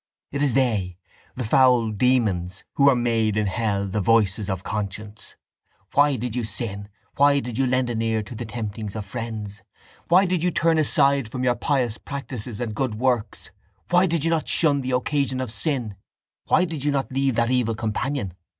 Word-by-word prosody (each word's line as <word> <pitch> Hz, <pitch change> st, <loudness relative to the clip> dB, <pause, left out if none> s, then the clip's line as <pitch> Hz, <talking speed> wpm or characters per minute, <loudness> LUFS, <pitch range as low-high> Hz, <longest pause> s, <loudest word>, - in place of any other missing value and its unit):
It 140 Hz, -, -3 dB
is 140 Hz, -4 st, +2 dB
they, 105 Hz, -9 st, 0 dB, 0.4 s
the 125 Hz, -, -3 dB
foul 120 Hz, -1 st, +4 dB
demons, 100 Hz, -6 st, 0 dB
who 140 Hz, 0 st, +5 dB
are 135 Hz, -, +4 dB
made 115 Hz, -3 st, +1 dB
in 105 Hz, -, +1 dB
hell 100 Hz, 0 st, -1 dB
the 100 Hz, +2 st, -2 dB
voices 105 Hz, -2 st, +2 dB
of 95 Hz, -1 st, -3 dB
conscience. 105 Hz, +1 st, -5 dB, 0.6 s
Why 145 Hz, 0 st, +4 dB
did 120 Hz, -1 st, -4 dB
you 125 Hz, -, -1 dB
sin? 105 Hz, -2 st, -2 dB, 0.3 s
Why 140 Hz, 0 st, +5 dB
did 125 Hz, -2 st, -5 dB
you 135 Hz, -, +2 dB
lend 125 Hz, -1 st, +1 dB
an 115 Hz, -1 st, -2 dB
ear 110 Hz, -1 st, 0 dB
to 105 Hz, -, -10 dB
the 115 Hz, 0 st, -6 dB
temptings 110 Hz, -2 st, -5 dB
of 105 Hz, -2 st, -4 dB
friends? 110 Hz, -2 st, -6 dB, 0.5 s
Why 185 Hz, +3 st, +5 dB
did 180 Hz, -2 st, 0 dB
you 180 Hz, -, +2 dB
turn 165 Hz, -1 st, +2 dB
aside 140 Hz, -3 st, +3 dB
from 125 Hz, +2 st, -4 dB
your 125 Hz, -1 st, +3 dB
pious 125 Hz, -4 st, -1 dB
practices 125 Hz, -6 st, -6 dB
and 120 Hz, -3 st, -3 dB
good 120 Hz, 0 st, -2 dB
works? 120 Hz, -1 st, -1 dB, 0.4 s
Why 180 Hz, +2 st, +5 dB
did 165 Hz, -3 st, -1 dB
you 165 Hz, -, +1 dB
not 160 Hz, -2 st, 0 dB
shun 145 Hz, -4 st, +2 dB
the 130 Hz, -, -4 dB
occasions 130 Hz, +1 st, 0 dB
of 120 Hz, -, -6 dB
sin? 125 Hz, -7 st, 0 dB, 0.5 s
Why 185 Hz, -, +4 dB
did 160 Hz, -5 st, -5 dB
you 145 Hz, -, +1 dB
not 135 Hz, -2 st, -2 dB
leave 135 Hz, -1 st, 0 dB
that 115 Hz, +1 st, +1 dB
evil 120 Hz, -3 st, +1 dB
companion? 110 Hz, -1 st, -2 dB
120 Hz, 190 wpm, -23 LUFS, 110-135 Hz, 0.6 s, who